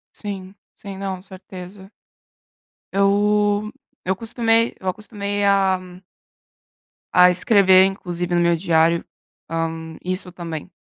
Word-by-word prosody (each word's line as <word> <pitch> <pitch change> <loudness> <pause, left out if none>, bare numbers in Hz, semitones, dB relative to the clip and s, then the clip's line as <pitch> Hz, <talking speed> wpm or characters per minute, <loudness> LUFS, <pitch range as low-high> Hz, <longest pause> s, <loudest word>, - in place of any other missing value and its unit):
Sim, 195 -2 -7 0.2
sim. 200 -2 -9
Não, 190 -1 -4
certeza. 190 0 -11 1.0
Eu 205 +1 +2 0.3
eu 185 - 0
acostumei 230 +2 0
eu 190 - -8
acostumei 205 0 -4
a 195 -2 +3 1.3
a 180 0 +7
escrever, 190 0 +5
inclusive 175 -2 -3
no 175 - +3
meu 170 0 +3
diário, 165 -1 +2 0.4
hã, 165 -1 -4
isso 185 0 -4
também. 165 -2 -7
190 Hz, 105 wpm, -21 LUFS, 175-205 Hz, 1.3 s, a